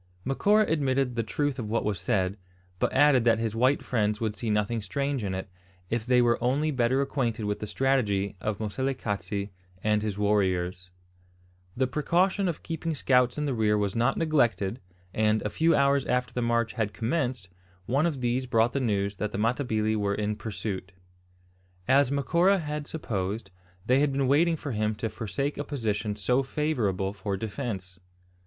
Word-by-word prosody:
Macora 205 Hz, -, +3 dB
admitted 135 Hz, -4 st, +1 dB
the 115 Hz, -, +1 dB
truth 140 Hz, +4 st, -2 dB
of 110 Hz, -3 st, -4 dB
what 115 Hz, -, 0 dB
was 105 Hz, -4 st, -1 dB
said, 95 Hz, -1 st, 0 dB, 0.4 s
but -, -, +1 dB
added 135 Hz, -3 st, +5 dB
that 115 Hz, -2 st, +5 dB
his 115 Hz, -1 st, -2 dB
white 130 Hz, +5 st, +2 dB
friends 105 Hz, -3 st, 0 dB
would 110 Hz, -2 st, -2 dB
see 115 Hz, +2 st, -4 dB
nothing 105 Hz, +2 st, 0 dB
strange 140 Hz, +5 st, -2 dB
in 95 Hz, -2 st, -2 dB
it, 95 Hz, -, -5 dB, 0.4 s
if 115 Hz, 0 st, -1 dB
they 125 Hz, -1 st, +5 dB
were 120 Hz, 0 st, +2 dB
only 145 Hz, +5 st, +1 dB
better 130 Hz, 0 st, +2 dB
acquainted 120 Hz, -6 st, -2 dB
with 105 Hz, 0 st, -2 dB
the 105 Hz, -, -5 dB
strategy 105 Hz, -7 st, +1 dB
of 105 Hz, 0 st, -2 dB
Moselekatse 105 Hz, -3 st, -2 dB, 0.3 s
and 105 Hz, 0 st, +2 dB
his 105 Hz, -2 st, -3 dB
warriors. 95 Hz, -3 st, 0 dB, 0.9 s
The 130 Hz, -, +3 dB
precaution 180 Hz, +8 st, +1 dB
of 170 Hz, -3 st, -3 dB
keeping 165 Hz, -1 st, -3 dB
scouts 125 Hz, -2 st, +2 dB
in 150 Hz, -, -1 dB
the 140 Hz, -, 0 dB
rear 105 Hz, -2 st, +2 dB
was 100 Hz, 0 st, -1 dB
not 120 Hz, +3 st, +2 dB
neglected; 120 Hz, -, +1 dB, 0.3 s
and, 110 Hz, -1 st, +2 dB
a 105 Hz, -, -2 dB
few 165 Hz, +6 st, +3 dB
hours 140 Hz, 0 st, +3 dB
after 125 Hz, 0 st, 0 dB
the 125 Hz, -, -1 dB
march 115 Hz, -1 st, +1 dB
had 105 Hz, -2 st, -2 dB
commenced, 125 Hz, -, -1 dB, 0.4 s
one 140 Hz, -, +2 dB
of 145 Hz, -6 st, -3 dB
these 125 Hz, +2 st, 0 dB
brought 115 Hz, 0 st, +2 dB
the 140 Hz, -, 0 dB
news 100 Hz, -5 st, 0 dB
that 105 Hz, +1 st, -2 dB
the -, -, -4 dB
Matabili 110 Hz, -1 st, 0 dB
were 100 Hz, -1 st, 0 dB
in 105 Hz, +1 st, -1 dB
pursuit. 100 Hz, -3 st, -5 dB, 0.9 s
As 135 Hz, 0 st, +4 dB
Macora 170 Hz, +8 st, +3 dB
had 150 Hz, -3 st, -4 dB
supposed, 105 Hz, -7 st, -3 dB, 0.3 s
they 130 Hz, +2 st, +4 dB
had 145 Hz, 0 st, +2 dB
been 135 Hz, -1 st, 0 dB
waiting 165 Hz, +5 st, +4 dB
for 145 Hz, -2 st, -5 dB
him 110 Hz, -1 st, 0 dB
to 110 Hz, +2 st, -3 dB
forsake 115 Hz, +7 st, -3 dB
a -, -, -1 dB
position 110 Hz, -7 st, -2 dB
so 125 Hz, +6 st, +1 dB
favourable 120 Hz, -10 st, -1 dB
for 100 Hz, -1 st, -3 dB
defence. 100 Hz, -4 st, -5 dB
115 Hz, 175 wpm, -27 LUFS, 105-135 Hz, 0.9 s, added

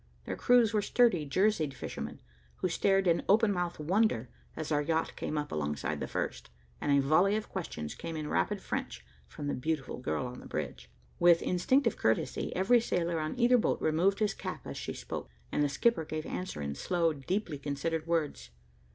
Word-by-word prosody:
Their -, -, -3 dB
crews 240 Hz, -3 st, +4 dB
were 210 Hz, -, +3 dB
sturdy, 205 Hz, -8 st, +3 dB
jerseyed 165 Hz, -3 st, +1 dB
fishermen, -, -, -6 dB, 0.3 s
who 185 Hz, -, -1 dB
stared 195 Hz, +3 st, +2 dB
in 170 Hz, -2 st, +3 dB
open 210 Hz, +1 st, +5 dB
mouthed 175 Hz, -2 st, -2 dB
wonder, 155 Hz, -, +1 dB, 0.3 s
as 155 Hz, 0 st, -4 dB
our 145 Hz, -1 st, +3 dB
yacht 160 Hz, +2 st, -1 dB
came 155 Hz, -, -3 dB
up 150 Hz, 0 st, -3 dB
alongside 75 Hz, -1 st, -2 dB
the -, -, -3 dB
first, -, -, -3 dB, 0.3 s
and 145 Hz, -, 0 dB
a 140 Hz, -, +5 dB
volley 165 Hz, +9 st, +4 dB
of 215 Hz, -, -3 dB
questions 75 Hz, -, -5 dB
came 165 Hz, -1 st, -6 dB
in 155 Hz, -1 st, -3 dB
rapid 85 Hz, -10 st, 0 dB
French -, -, -4 dB, 0.2 s
from 145 Hz, -, -7 dB
the 145 Hz, -, -1 dB
beautiful 135 Hz, -1 st, -2 dB
girl 130 Hz, -, -2 dB
on 125 Hz, 0 st, -7 dB
the -, -, -11 dB
bridge. 60 Hz, +1 st, -5 dB, 0.3 s
With 175 Hz, -1 st, +6 dB
instinctive 260 Hz, +10 st, +2 dB
courtesy, -, -, 0 dB
every 220 Hz, +6 st, +4 dB
sailor 170 Hz, -6 st, 0 dB
on 155 Hz, +8 st, -3 dB
either 245 Hz, 0 st, +5 dB
boat -, -, +1 dB
removed 175 Hz, +6 st, +2 dB
his 215 Hz, -2 st, +1 dB
cap -, -, -6 dB
as -, -, -6 dB
she -, -, -4 dB
spoke, -, -, -6 dB, 0.2 s
and -, -, +1 dB
the 145 Hz, -, +3 dB
skipper 165 Hz, -, +2 dB
gave 155 Hz, 0 st, -4 dB
answer 180 Hz, -, -4 dB
in 70 Hz, 0 st, -3 dB
slow, 165 Hz, -, +1 dB
deeply 155 Hz, +2 st, -3 dB
considered 155 Hz, +3 st, -2 dB
words. 150 Hz, -, -1 dB
165 Hz, 190 wpm, -31 LUFS, 145-195 Hz, 0.3 s, With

